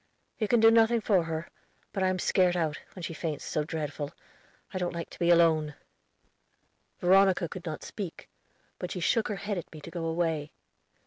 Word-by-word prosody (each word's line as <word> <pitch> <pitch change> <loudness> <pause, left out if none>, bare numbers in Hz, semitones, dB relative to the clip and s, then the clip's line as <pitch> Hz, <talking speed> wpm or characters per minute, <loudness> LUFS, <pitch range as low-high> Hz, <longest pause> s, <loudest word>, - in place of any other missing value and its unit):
"You 215 - +1
can 240 +2 +4
do 225 0 +7
nothing 230 +1 +5
for 195 -6 +2
her; 160 0 -3 0.5
but 195 - -2
I 190 - +3
am 185 0 +1
scared 180 0 +2
out, 155 -3 -1 0.2
when 180 - -8
she 165 - -4
faints 155 -3 -4
so 150 - -1
dreadful; 150 -2 -4 0.6
I 185 - -2
don't 175 -1 -2
like 170 - -5
to - - -12
be 170 - +2
alone." 160 -3 +4 1.2
Veronica 190 0 +4
could 175 +2 -8
not 155 - -5
speak, 195 -6 -7 0.5
but 180 - -4
she 180 - -4
shook 220 +6 +2
her 210 - -2
head 200 -1 -3
at 170 - -10
me 155 - -10
to 165 - -9
go 170 -1 -4
away. 160 -2 -1
175 Hz, 195 wpm, -29 LUFS, 160-190 Hz, 1.2 s, do